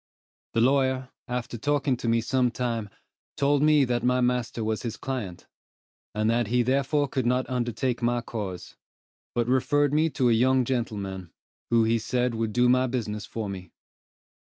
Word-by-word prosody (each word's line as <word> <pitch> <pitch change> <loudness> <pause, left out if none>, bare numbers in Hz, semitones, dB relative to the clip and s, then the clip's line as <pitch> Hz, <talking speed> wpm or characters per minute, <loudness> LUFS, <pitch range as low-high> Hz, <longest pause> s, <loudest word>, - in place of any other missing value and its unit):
The 115 - +3
lawyer, 130 0 +2 0.2
after 125 -2 -4
talking 145 +1 +1
to 120 - -5
me 115 0 +3
some 125 +1 +1
time, 115 -3 -3 0.5
told 140 0 +2
me 150 -2 +5
that 120 -1 0
my 125 0 +2
master 125 -2 0
was 110 0 -1
his 115 -2 -5
client, 120 -10 -5 0.7
and 110 0 +1
that 115 0 +1
he 120 +2 +2
therefore 140 +3 +1
could 130 -2 -1
not 125 +1 +1
undertake 120 0 -2
my 120 0 +1
cause; 100 -6 -6 0.6
but 120 -1 +1
referred 145 +3 +2
me 155 +2 +3
to 130 -4 +1
a - - +4
young 130 +2 +3
gentleman, 100 -7 -3 0.4
who 115 -1 +4
he 115 +1 +2
said 125 +2 0
would 110 -1 -2
do 125 +2 +3
my 130 +1 +3
business 105 -5 -3
for 110 -2 -4
me. 95 -3 -7
125 Hz, 170 wpm, -26 LUFS, 115-130 Hz, 0.7 s, me